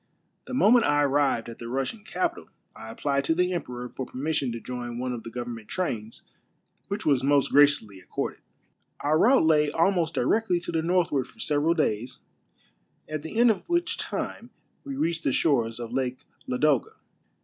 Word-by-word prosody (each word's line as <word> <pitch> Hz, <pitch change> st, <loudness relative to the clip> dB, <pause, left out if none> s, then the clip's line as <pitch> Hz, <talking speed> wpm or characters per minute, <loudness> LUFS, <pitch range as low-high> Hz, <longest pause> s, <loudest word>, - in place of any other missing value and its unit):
The -, -, -5 dB
moment 240 Hz, -1 st, +5 dB
I 145 Hz, 0 st, +3 dB
arrived 140 Hz, -4 st, +1 dB
at 115 Hz, -, -9 dB
the 115 Hz, -, -7 dB
Russian 135 Hz, -, -3 dB
capital 185 Hz, -3 st, -3 dB, 0.3 s
I 110 Hz, -, -9 dB
applied 140 Hz, +4 st, -1 dB
to 160 Hz, -, +2 dB
the 180 Hz, +1 st, +1 dB
emperor 125 Hz, -8 st, -4 dB
for 130 Hz, +1 st, -6 dB
permission 140 Hz, -1 st, -2 dB
to 115 Hz, -, -5 dB
join 120 Hz, 0 st, -6 dB
one 125 Hz, 0 st, -2 dB
of 120 Hz, -, -5 dB
the 115 Hz, -, -8 dB
government 120 Hz, -2 st, -6 dB
trains, 115 Hz, -, -4 dB, 0.6 s
which 200 Hz, +1 st, -4 dB
was 140 Hz, -4 st, +3 dB
most 140 Hz, 0 st, +3 dB
graciously 140 Hz, -9 st, +4 dB
accorded. 90 Hz, -, -4 dB, 0.6 s
Our 155 Hz, +2 st, +2 dB
route 250 Hz, -3 st, +5 dB
lay 150 Hz, -2 st, +4 dB
almost 165 Hz, +1 st, +1 dB
directly 180 Hz, -, +2 dB
to 175 Hz, -, -4 dB
the 165 Hz, -1 st, 0 dB
northward 165 Hz, -6 st, +1 dB
for -, -, -20 dB
several 155 Hz, -2 st, +1 dB
days, 120 Hz, -6 st, -1 dB, 0.9 s
at 155 Hz, -1 st, -4 dB
the 160 Hz, +8 st, -7 dB
end 240 Hz, 0 st, +6 dB
of 215 Hz, -, -5 dB
which 345 Hz, 0 st, 0 dB
time -, -, -4 dB, 0.3 s
we 280 Hz, -2 st, -5 dB
reached 165 Hz, -9 st, -1 dB
the -, -, +1 dB
shores 120 Hz, -7 st, +1 dB
of 120 Hz, 0 st, -6 dB
Lake 130 Hz, -1 st, -2 dB, 0.3 s
Ladoga. 135 Hz, 0 st, +1 dB
145 Hz, 175 wpm, -26 LUFS, 125-170 Hz, 0.9 s, end